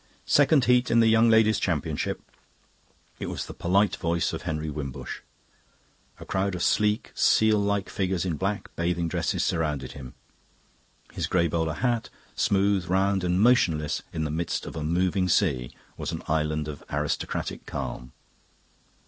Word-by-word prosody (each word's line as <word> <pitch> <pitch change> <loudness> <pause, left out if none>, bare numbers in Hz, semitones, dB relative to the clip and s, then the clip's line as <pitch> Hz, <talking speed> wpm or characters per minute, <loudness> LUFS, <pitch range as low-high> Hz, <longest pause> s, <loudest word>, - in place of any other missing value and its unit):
"Second 145 -2 +4
Heat 125 0 +3
in 115 - +4
the 115 - +5
Young 115 +1 +5
Ladies' 110 -1 +4
Championship." 80 -3 -2 1.0
It - - -4
was - - -4
the - - -8
polite 95 +2 +1
voice 85 0 0
of - - -4
Henry 80 -2 -3
Wimbush. 70 -3 -6 1.0
A - - -9
crowd 95 0 -1
of 90 - -2
sleek, 105 0 +1
seal 110 -1 +4
like 100 -1 0
figures 95 -3 -1
in 85 -4 -1
black 100 +5 -3
bathing 85 0 0
dresses - - -1
surrounded 75 -7 -1
him. 65 -3 -10 1.0
His - - -2
grey 85 -2 +2
bowler 80 -1 -1
hat, 120 -3 -1 0.3
smooth, 100 -2 +2
round, 95 +1 +1
and 90 0 +1
motionless 95 - +3
in 80 - -3
the 75 - -2
midst 80 +2 -2
of - - -8
a 80 - -3
moving 90 +3 +1
sea, 70 - +1 0.3
was - - -4
an - - -5
island 75 -1 0
of 75 -2 -7
aristocratic 75 0 -3
calm. - - -5
90 Hz, 155 wpm, -26 LUFS, 80-100 Hz, 1.0 s, the